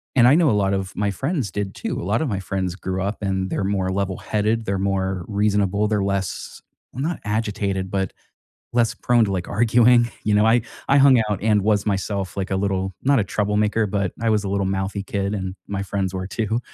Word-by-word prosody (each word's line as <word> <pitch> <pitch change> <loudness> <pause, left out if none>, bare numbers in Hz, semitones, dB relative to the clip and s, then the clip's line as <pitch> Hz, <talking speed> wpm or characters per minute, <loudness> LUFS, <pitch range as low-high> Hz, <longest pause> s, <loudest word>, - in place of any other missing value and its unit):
And 120 -2 +6
I 130 - +7
know 165 -2 +4
a - - +3
lot 95 0 +1
of 95 -1 -2
my 100 -1 0
friends 135 - -2
did, 100 -1 -4
too. - - -3
A - - -6
lot 105 +6 0
of - - -1
my 100 -6 -2
friends 95 -2 -3
grew 95 -1 -3
up, 100 +2 -2
and 95 -1 -1
they're - - -1
more 95 -1 0
level-headed, 105 +3 -1
they're 100 -1 -1
more 95 -1 -1
reasonable, 105 -1 +1
they're 105 -2 0
less 100 -1 -3 0.3
well, 130 - -4
not 165 +3 -2
agitated, 100 -3 -2
but 95 -2 -1 0.6
less 120 -2 +2
prone 120 -1 +2
to, 100 - -2
like, 90 -2 -2
arguing. 120 +2 +4
You 105 -1 +3
know, 105 +1 +4
I 115 +2 +4 0.3
I 140 - +5
hung 135 -3 +7
out, 100 -2 -2
and 105 -1 +3
was 105 -1 +2
myself 100 -2 -2
like 95 0 -3
a 95 - +1
little 95 -1 -1
not 140 -1 +4
a - - +2
troublemaker, 105 +2 0
but 100 -2 -1
I 115 - +1
was 105 -1 +2
a 100 - -3
little 100 0 0
mouthy 95 +1 -2
kid, 100 0 -2
and 95 -2 -4
my 100 -1 -3
friends 95 -1 -2
were, 95 0 -4
too. 110 +4 -1
100 Hz, 220 wpm, -22 LUFS, 95-110 Hz, 0.6 s, I